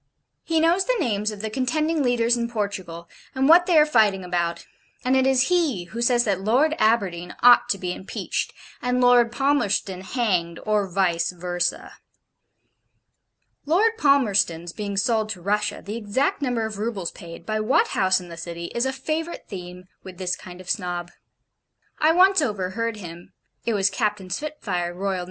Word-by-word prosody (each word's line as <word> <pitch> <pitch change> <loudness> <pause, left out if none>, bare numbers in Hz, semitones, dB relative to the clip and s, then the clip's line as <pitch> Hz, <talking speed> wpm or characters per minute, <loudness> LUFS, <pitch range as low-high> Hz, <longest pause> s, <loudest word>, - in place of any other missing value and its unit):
He 325 -1 +1
knows 340 +4 +3
the - - +1
names 215 - 0
of 210 -2 -7
the 220 0 -4
contending 305 +6 0
leaders 240 -2 +2
in 235 -1 -2
Portugal, 190 -6 -4 0.3
and 265 +1 +2
what 345 +3 +6
they 350 -3 +4
are 300 - +7
fighting 215 -9 +2
about: 170 -1 -2 0.4
and 255 +1 +3
it 265 0 +3
is 265 +2 +3
he 320 - +1
who 220 +7 -7
says 240 0 +3
that 195 -4 -1
Lord 255 +10 +2
Aberdeen 195 -6 +1
ought 245 0 +7
to 200 - +1
be 180 -1 -3
impeached, 190 - -4 0.3
and 250 0 0
Lord 245 -1 +5
Palmerston 240 -9 0
hanged, 185 -7 -1
or 210 -2 +1
VICE 175 -3 +1
VERSA. 175 0 -3 1.7
Lord 425 +9 +3
Palmerston's 200 - +2
being 200 -2 -5
sold 220 +1 +1
to 190 -5 -5
Russia, 210 +1 -1
the 210 +3 -4
exact 235 +7 -1
number 245 -5 -1
of 215 -2 -6
roubles 210 -5 -3
paid, 170 0 -11
by 215 +2 -1
what 215 - +2
house 190 -1 +2
in 180 - -11
the 170 - -9
City, 170 +1 -6
is 235 +2 0
a - - 0
favourite 315 +5 -4
theme 180 -2 -8 0.2
with 185 -2 -11
this 180 -1 -1
kind 180 -1 -12
of 185 - -12
Snob. 175 -3 -3 0.9
I 310 +1 +4
once 375 +1 +5
overheard 220 -1 -2
him 175 -3 -10 0.3
it 230 - +1
was 195 0 +2
Captain 210 -5 -2
Spitfire, 185 - -3
R.N. 195 -1 -1
210 Hz, 170 wpm, -23 LUFS, 185-255 Hz, 1.7 s, are